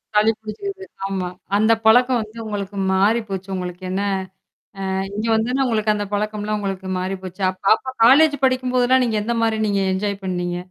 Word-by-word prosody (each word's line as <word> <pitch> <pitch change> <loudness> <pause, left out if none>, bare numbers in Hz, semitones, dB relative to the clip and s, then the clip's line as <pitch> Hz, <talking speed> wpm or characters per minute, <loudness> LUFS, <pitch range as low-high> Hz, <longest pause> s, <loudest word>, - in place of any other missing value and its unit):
சளி 210 +1 +5
பிடிச்சுக்குது, 385 - -6 0.2
ஆமா. 190 -2 -2 0.3
அந்த 220 +2 +3
பழக்கம் 245 +2 +5
வந்து, 215 +1 -10
உங்களுக்கு 205 -2 -5 0.2
மாறி 205 +5 +3
போச்சு. 190 0 -5
உங்களுக்கு, 180 0 -6
என்ன 195 +2 -1 0.9
ஆ, - - -1 0.2
இங்க 215 +2 -2
வந்தொன்னே, 250 +5 +1
உங்களுக்கு 215 -2 +1
அந்த 205 -1 -3
பழக்கம்லாம், 210 0 -1
உங்களுக்கு 195 -2 -4
மாறி 190 +1 -3
போச்சு. 185 +1 -8
அப் 185 - -18
அப்ப 260 +2 -8
காலேஜ் 290 +5 +6
படிக்கும்போதெல்லா, 255 0 +2
நீங்க 225 -2 0
எந்த 235 +2 -1
மாரி, 220 -1 +1
நீங்க 200 -1 +1
என்ஜாய் 200 +1 -2
பண்ணீங்க? 175 -1 -2
215 Hz, 170 wpm, -21 LUFS, 195-235 Hz, 0.9 s, காலேஜ்